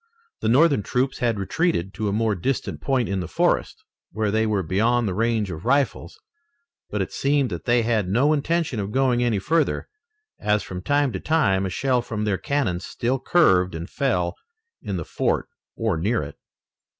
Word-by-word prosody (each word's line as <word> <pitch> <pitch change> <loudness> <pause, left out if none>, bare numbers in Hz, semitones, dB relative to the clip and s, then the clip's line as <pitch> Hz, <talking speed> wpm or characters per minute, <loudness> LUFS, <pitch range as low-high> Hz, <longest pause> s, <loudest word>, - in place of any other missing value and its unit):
The - - 0
Northern 140 0 +4
troops 125 +6 -1
had 115 -3 +1
retreated 100 - -1
to 110 - -3
a - - 0
more 110 +1 +1
distant 120 +8 -2
point 130 -4 +1
in 100 -1 -1
the 90 - -4
forest, - - 0 0.3
where 110 -2 -1
they 110 +1 +1
were 105 -3 0
beyond 115 +7 +1
the 95 - -1
range 110 -1 0
of 80 +1 -7
rifles, 140 +3 0 0.7
but 105 -2 -1
it - - -8
seemed 140 -2 +1
that - - -5
they 120 -1 +3
had 110 -5 0
no 130 +10 +3
intention 155 -4 0
of 100 0 -3
going 130 -1 +2
any 120 -4 +1
further, 155 - 0 0.5
as 105 0 +1
from 90 -1 -6
time 145 +4 +1
to - - -4
time 100 -12 +1
a - - -3
shell 125 +5 +1
from 105 -3 -4
their 100 -3 0
cannon 140 -12 -1
still 125 +7 -2
curved 95 - +3
and 85 +1 -6
fell 90 -10 0 0.5
in - - -3
the - - -4
fort - - -1 0.3
or 110 -7 0
near 100 +4 0
it. 70 - -8
115 Hz, 185 wpm, -23 LUFS, 95-135 Hz, 0.7 s, Northern